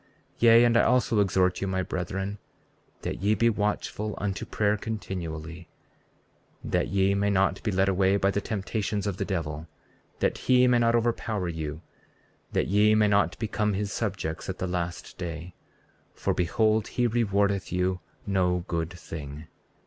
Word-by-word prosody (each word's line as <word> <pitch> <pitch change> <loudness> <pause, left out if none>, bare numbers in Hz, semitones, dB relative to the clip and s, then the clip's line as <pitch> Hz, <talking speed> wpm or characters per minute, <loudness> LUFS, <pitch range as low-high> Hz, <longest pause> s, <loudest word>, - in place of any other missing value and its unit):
34:39 - - -34 0.3
Yea, 115 0 +7
and 120 -1 +4
I - - +6
also 125 -3 +2
exhort 95 -2 +2
you, 95 - -1
my 95 -1 0
brethren, 95 +3 -4 0.6
that - - -4
ye 105 +2 +3
be 115 +3 +3
watchful 105 0 -2
unto 100 -1 -3
prayer 105 -1 +1
continually, 85 -6 -6 0.9
that - - 0
ye 100 0 +2
may 100 +1 +1
not 95 -1 +2
be 110 - -1
led 95 0 +2
away 95 +1 +3
by 100 0 +2
the 100 - -1
temptations 105 0 -2
of 100 -3 -2
the - - -2
devil, 80 -4 -3 0.5
that - - 0
he 125 -1 +4
may 125 -1 +4
not 115 0 +3
overpower 115 -4 0
you, 80 -1 -5 0.7
that - - +1
ye 105 +3 +4
may 105 -1 +4
not 100 0 +2
become 105 -2 -1
his 100 0 -2
subjects 95 -8 -3
at 95 - -3
the - - -2
last 90 -1 -4
day; 85 0 -5 0.6
for - - 0
behold, 110 +4 +1
he 125 - 0
rewardeth 100 -4 +1
you 90 0 0 0.3
no 90 -3 +1
good 85 -1 -1
thing. 80 -4 -8
100 Hz, 165 wpm, -27 LUFS, 90-105 Hz, 0.9 s, Yea